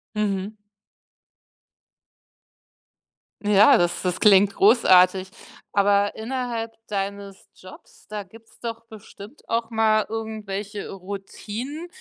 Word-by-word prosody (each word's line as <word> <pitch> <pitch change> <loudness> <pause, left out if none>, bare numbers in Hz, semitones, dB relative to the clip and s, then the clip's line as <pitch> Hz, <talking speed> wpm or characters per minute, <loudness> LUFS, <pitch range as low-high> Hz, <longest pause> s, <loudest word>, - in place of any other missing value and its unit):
Mhm. 205 -1 -2 2.9
Ja, 210 0 +6
das 175 0 0
das 180 -2 -1
klingt 200 -1 +5
großartig, 190 -4 +5 0.4
aber 200 0 +2
innerhalb 230 -1 -4
deines 200 -1 -5
Jobs, 465 -2 -16
da 210 -2 -5
gibt's 225 +4 -19
doch 230 -1 -6
bestimmt 215 +3 -14
auch 230 0 -1
mal 220 -1 +2
irgendwelche 210 -2 -5
Routinen, 205 - -7
210 Hz, 90 wpm, -23 LUFS, 195-225 Hz, 2.9 s, Ja